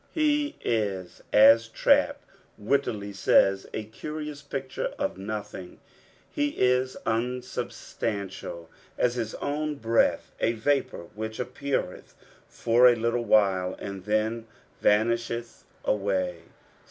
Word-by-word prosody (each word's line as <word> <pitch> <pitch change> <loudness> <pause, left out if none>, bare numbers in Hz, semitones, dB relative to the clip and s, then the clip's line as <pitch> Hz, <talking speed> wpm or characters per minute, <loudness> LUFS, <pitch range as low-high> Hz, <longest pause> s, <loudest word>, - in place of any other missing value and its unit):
He 295 -2 +1
is 100 -5 -2
as 115 +2 +7
Trapp 115 - +2 0.4
wittily 105 -3 -1
aaya 95 0 +3
" - - -28
a 110 - -3
curious 150 +6 -7
picture 135 -2 -4
of - - -2
nothing." 100 -3 -6 0.5
He 290 0 -1
is 125 +1 +2
unauhstantisl 110 -6 -3 0.3
as 120 - +2
his 115 -3 -3
own 150 +1 -2
breath, 115 -4 +1
a. 115 - +2
vapour 120 -7 -1
which 110 +1 -5
appeareth 130 -5 -3 0.3
for 120 +2 +4
a 120 - +6
little 115 +1 -1
while, 95 -4 +3
and 100 -2 -7
then 110 +2 0 0.4
VHnisheth 115 +2 +1 0.2
awaj. 95 -3 0
115 Hz, 110 wpm, -27 LUFS, 100-125 Hz, 0.5 s, as